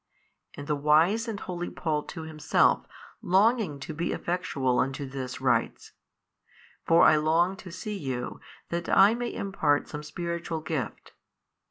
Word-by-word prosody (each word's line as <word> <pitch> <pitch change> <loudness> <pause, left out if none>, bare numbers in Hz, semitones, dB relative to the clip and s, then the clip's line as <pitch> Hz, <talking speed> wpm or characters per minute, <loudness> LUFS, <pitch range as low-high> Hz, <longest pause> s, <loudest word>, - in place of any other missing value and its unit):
And 145 - -7
the 150 - 0
wise 160 - +3
and 215 -3 -4
holy 175 -2 -5
Paul 155 -3 -2
too 160 +2 -8
himself 155 -2 +2 0.3
longing 195 - +2
to 155 - -6
be 165 +3 -2
effectual 140 -8 -1
unto 135 +2 -1
this 130 -2 -6
writes, - - 0 1.0
For 165 +1 +6
I 155 - +7
long 165 +5 +2
to 190 - -10
see 205 +3 -5
you 130 -5 -4 0.3
that 170 +1 -3
I 200 +3 +6
may 240 0 -3
impart 155 -7 0
some 150 - -6
spiritual 170 +1 -4
gift. 155 -8 -5
165 Hz, 145 wpm, -27 LUFS, 145-185 Hz, 1.0 s, I